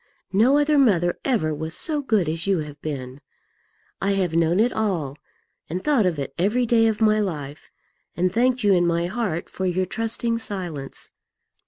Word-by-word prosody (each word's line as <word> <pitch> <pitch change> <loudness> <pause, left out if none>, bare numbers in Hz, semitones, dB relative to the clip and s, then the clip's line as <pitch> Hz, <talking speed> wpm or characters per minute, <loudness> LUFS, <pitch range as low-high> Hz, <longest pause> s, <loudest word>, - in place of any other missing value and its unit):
No 240 +8 +4
other 295 0 +3
mother 175 -9 +2
ever 210 - +1
was 160 +2 -4
so 305 -3 -1
good 215 - +1
as 165 +3 -3
you 195 -2 +3
have 150 -1 -9
been. 135 -3 -6 0.8
I 200 +1 +1
have 185 -4 0
known 165 +2 +2
it 240 +3 +3
all, 175 -11 -1 0.5
and 180 +4 -4
thought 270 -10 +3
of 170 -4 -1
it 140 -2 -4
every 215 +7 +2
day 225 -1 +4
of 220 0 -1
my 215 -1 +4
life, 150 -8 -4 0.5
and 180 +1 +1
thanked 250 +1 +2
you 205 -1 +5
in 175 -1 +3
my 170 0 +1
heart 180 -4 -2
for 190 - -3
your 185 +1 0
trusting 230 +3 -1
silence. 175 -11 -6
190 Hz, 180 wpm, -23 LUFS, 165-225 Hz, 0.8 s, you